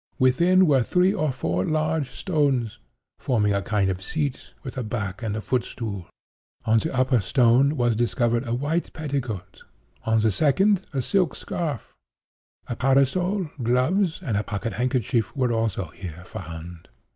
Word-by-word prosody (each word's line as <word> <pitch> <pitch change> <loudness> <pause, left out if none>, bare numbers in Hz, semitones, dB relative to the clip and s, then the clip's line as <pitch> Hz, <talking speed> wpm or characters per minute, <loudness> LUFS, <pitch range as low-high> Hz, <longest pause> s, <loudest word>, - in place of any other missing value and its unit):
Within 170 +9 +4
were 140 -5 +4
three 180 +9 +3
or 155 -8 0
four 90 -8 -1
large 155 -1 0
stones, 140 - 0 0.4
forming 105 -5 +1
a 100 - +1
kind 100 +1 +1
of 95 0 -5
seat 140 +6 -3
with 130 - -7
a 130 - -2
back 105 -3 -4
and 110 -1 -3
footstool. 110 -4 -3 0.6
On 110 0 +4
the 160 - -3
upper 130 -1 +2
stone 125 +7 +3
was 120 -2 +2
discovered 120 +1 +1
a 115 - -1
white 150 +7 -1
petticoat; 125 - -4 0.4
on 110 0 +2
the 110 0 +3
second, 190 - +2
a 135 -3 -1
silk 180 +1 +1
scarf. 155 -8 -4 0.7
A 120 - -4
parasol, 150 - +2
gloves, 145 - +1
and 115 - -1
a 105 - 0
pocket 105 +1 -4
handkerchief, 125 -1 0
were 125 -3 +2
also 110 -6 -1
here 90 0 -9
found. 85 -1 -8
125 Hz, 150 wpm, -24 LUFS, 110-150 Hz, 0.7 s, Within